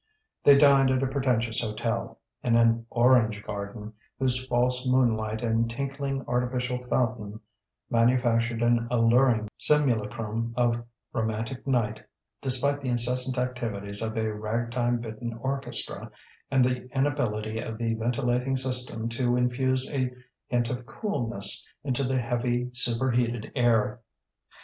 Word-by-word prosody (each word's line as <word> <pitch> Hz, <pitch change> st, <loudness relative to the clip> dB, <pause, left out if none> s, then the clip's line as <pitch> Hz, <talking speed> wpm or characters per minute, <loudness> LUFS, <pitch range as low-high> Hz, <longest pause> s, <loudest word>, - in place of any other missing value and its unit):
They 140 Hz, -1 st, +7 dB
dined 140 Hz, -2 st, +5 dB
at 130 Hz, 0 st, +1 dB
a -, -, +1 dB
pretentious 125 Hz, -4 st, 0 dB
hotel, 115 Hz, +1 st, -3 dB, 0.2 s
in 120 Hz, -1 st, +1 dB
an 115 Hz, 0 st, +2 dB
"Orange 120 Hz, -4 st, +3 dB
Garden" 105 Hz, +1 st, -7 dB, 0.2 s
whose 130 Hz, -1 st, -1 dB
false 125 Hz, +1 st, +1 dB
moonlight 110 Hz, -3 st, +1 dB
and 115 Hz, 0 st, 0 dB
tinkling, 135 Hz, +1 st, -4 dB
artificial 125 Hz, 0 st, -2 dB
fountain 110 Hz, -4 st, -2 dB, 0.5 s
manufactured 120 Hz, -1 st, +1 dB
an 120 Hz, 0 st, +2 dB
alluring 115 Hz, -1 st, +3 dB
simulacrum 115 Hz, -5 st, +1 dB
of 120 Hz, -1 st, +1 dB, 0.3 s
romantic 115 Hz, +3 st, -3 dB
night, 110 Hz, -5 st, -1 dB, 0.4 s
despite 140 Hz, +2 st, +3 dB
the 130 Hz, -, -3 dB
incessant 125 Hz, +2 st, +3 dB
activities 115 Hz, -5 st, 0 dB
of 110 Hz, 0 st, -2 dB
a 110 Hz, -1 st, -1 dB
ragtime 120 Hz, +3 st, -2 dB
bitten 115 Hz, 0 st, -6 dB
orchestra 135 Hz, +1 st, -1 dB, 0.4 s
and 135 Hz, -2 st, +3 dB
the 125 Hz, 0 st, -2 dB
inability 115 Hz, -6 st, -1 dB
of 110 Hz, -1 st, -6 dB
the 115 Hz, 0 st, -1 dB
ventilating 125 Hz, +3 st, -1 dB
system 125 Hz, -3 st, 0 dB
to 120 Hz, +1 st, 0 dB
infuse 130 Hz, +1 st, +1 dB
a 130 Hz, -2 st, -1 dB, 0.4 s
hint 120 Hz, -1 st, -1 dB
of 125 Hz, -1 st, -6 dB
coolness 115 Hz, -, +1 dB
into 140 Hz, -1 st, -1 dB
the 130 Hz, 0 st, 0 dB
heavy, 120 Hz, 0 st, -2 dB
superheated 120 Hz, -1 st, +1 dB
air. 120 Hz, -1 st, +1 dB
120 Hz, 125 wpm, -26 LUFS, 115-130 Hz, 0.5 s, They